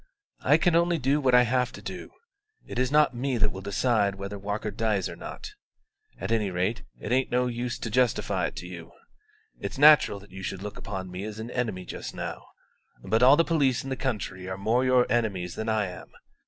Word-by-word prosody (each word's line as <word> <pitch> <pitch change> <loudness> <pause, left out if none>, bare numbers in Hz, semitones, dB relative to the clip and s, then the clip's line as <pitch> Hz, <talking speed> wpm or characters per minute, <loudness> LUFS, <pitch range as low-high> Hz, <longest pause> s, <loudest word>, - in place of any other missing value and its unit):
"I - - +5
can 175 -3 +2
only 170 0 +3
do 140 +1 +1
what 130 -2 +4
I 125 - +7
have 125 0 +1
to - - -9
do: - - -7 0.6
it - - -5
is 130 +1 +1
not 150 -2 +4
me 130 +1 -1
that 105 -1 +2
will 95 - -7
decide 100 0 +1
whether 100 +1 -6
Walker 105 +2 -3
dies 105 -3 0
or - - -7
not. - - -8 0.7
At 95 +5 -4
any 110 -3 +1
rate, 95 +5 -1 0.2
it 105 - -5
ain't 130 +1 +2
no 125 +1 +2
use 120 0 -3
to 115 - -5
justify 125 0 +1
it - - -9
to - - -7
you. 85 -2 -10 0.7
It's - - -5
natural 145 -8 +6
that 100 - -17
you 95 0 -8
should 95 0 -5
look 105 -1 -7
upon 95 -2 -6
me 90 +2 -5
as 105 0 -6
an 110 +2 -6
enemy 110 -8 -2
just - - -7
now; - - -6 0.6
but 110 - +1
all 130 +3 +7
the 165 - +5
police 140 -7 +2
in 135 - -6
the - - 0
country 100 -8 -4
are 95 - -4
more 110 +6 +1
your 130 -1 +4
enemies 100 -7 -1
than 110 +1 -4
I 110 -3 +1
am. - - -11
110 Hz, 220 wpm, -27 LUFS, 100-125 Hz, 0.7 s, I